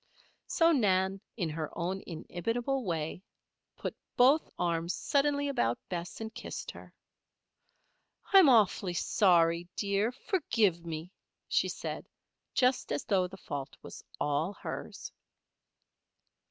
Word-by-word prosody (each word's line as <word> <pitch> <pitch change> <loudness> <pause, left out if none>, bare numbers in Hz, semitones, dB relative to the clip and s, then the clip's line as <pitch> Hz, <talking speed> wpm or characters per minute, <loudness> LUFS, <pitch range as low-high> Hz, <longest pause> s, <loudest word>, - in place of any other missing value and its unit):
So 330 0 +4
Nan, 195 - +2 0.2
in 180 -6 0
her 155 0 -3
own 185 +3 -2
inimitable, 230 +10 -2
loving 240 - -7
way, 165 +1 -2 0.5
put - - -4 0.2
both 270 +6 +5
arms 170 0 0
suddenly 285 0 +1
about 240 - +1
Bess 175 0 -5
and 220 0 -6
kissed - - -6
her. - - -13 1.4
"I'm 380 -7 +9
awfully 200 -6 +4
sorry, 170 -2 +3
dear; 200 +2 +1
forgive 225 - +1
me," 165 +1 -6 0.4
she - - +2
said, - - -5 0.5
just 255 0 +2
as 145 - -2
though 185 -3 +2
the 190 - -11
fault 140 -6 -6
was - - -10 0.2
all 150 +6 0
hers. - - -7
190 Hz, 120 wpm, -31 LUFS, 170-245 Hz, 1.4 s, I'm